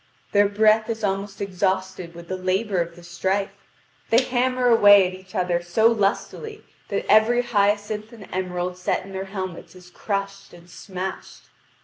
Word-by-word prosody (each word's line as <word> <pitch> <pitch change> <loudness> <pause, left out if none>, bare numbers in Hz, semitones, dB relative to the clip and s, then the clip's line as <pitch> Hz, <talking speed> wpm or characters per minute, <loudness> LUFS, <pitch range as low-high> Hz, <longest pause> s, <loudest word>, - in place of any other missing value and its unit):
Their 205 -1 +4
breath 215 +2 +3
is 225 -1 -3
almost 195 0 -2
exhausted 190 -2 -2
with 170 0 -11
the 185 - -3
labour 185 +1 0
of 170 0 -5
the 175 - -14
strife; 190 +3 -1 0.6
they 235 +3 +4
hammer 255 0 0
away 205 -5 +7
at 185 - -7
each 185 0 -13
other 180 -1 0
so 220 +7 +3
lustily 235 - -2 0.3
that 200 - -2
every 225 +4 +4
hyacinth 210 -1 0
and 220 -5 -12
emerald 180 -1 -3
set 180 0 -1
in 195 - -11
their 190 0 -4
helmets 185 -3 -7
is 180 -1 -15
crushed 195 -1 -4
and 175 0 -16
smashed. 190 -1 -7
195 Hz, 160 wpm, -23 LUFS, 185-215 Hz, 0.6 s, away